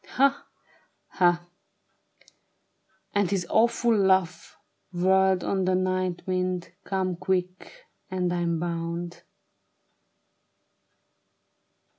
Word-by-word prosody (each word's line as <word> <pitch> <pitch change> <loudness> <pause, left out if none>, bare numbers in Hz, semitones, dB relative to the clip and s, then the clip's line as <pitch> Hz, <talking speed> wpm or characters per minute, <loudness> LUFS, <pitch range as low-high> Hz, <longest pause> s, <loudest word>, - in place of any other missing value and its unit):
Ha! 275 +1 +1 0.6
ha! 175 -2 +2 0.8
" - - -44
And 205 -3 +2
his 190 -3 -1
awful 235 +1 +3
laugh 190 -4 +1 0.3
whirled 190 +1 +3
on 190 -1 0
the 185 0 +2
night 185 -1 -1
wind; 185 -1 -2
" - - -47
Come 185 -2 -1
quick! 185 - -3 0.3
And 180 -2 -1
I'm 170 -2 -1
bound. 170 0 -4
185 Hz, 90 wpm, -26 LUFS, 175-190 Hz, 0.8 s, awful